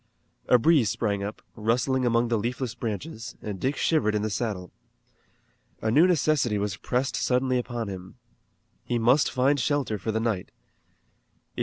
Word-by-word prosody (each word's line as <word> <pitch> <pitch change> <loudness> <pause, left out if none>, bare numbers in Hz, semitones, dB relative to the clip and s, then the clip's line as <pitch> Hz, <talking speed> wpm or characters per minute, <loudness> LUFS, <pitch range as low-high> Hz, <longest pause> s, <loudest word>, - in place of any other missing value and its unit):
A 125 - +6
breeze 140 -4 +4
sprang 100 -1 -1
up, 100 +2 -6
rustling 125 +4 +1
among 115 0 +2
the 115 - +2
leafless 120 +2 -3
branches, 115 +1 -5
and 100 -3 -6
Dick 135 +7 0
shivered 110 -10 +2
in 105 - 0
the 110 - -1
saddle. 100 -5 -3 1.1
A 110 - -1
new 155 +9 +6
necessity 150 - +2
was 100 -2 -2
pressed 125 +6 -1
suddenly 130 0 +1
upon 120 -2 -4
him. 95 +1 -8 0.7
He 120 - -1
must 125 +5 +4
find 135 +3 +2
shelter 130 -5 0
for 110 - -2
the 110 - 0
night. 110 -5 -1
120 Hz, 155 wpm, -26 LUFS, 105-130 Hz, 1.1 s, A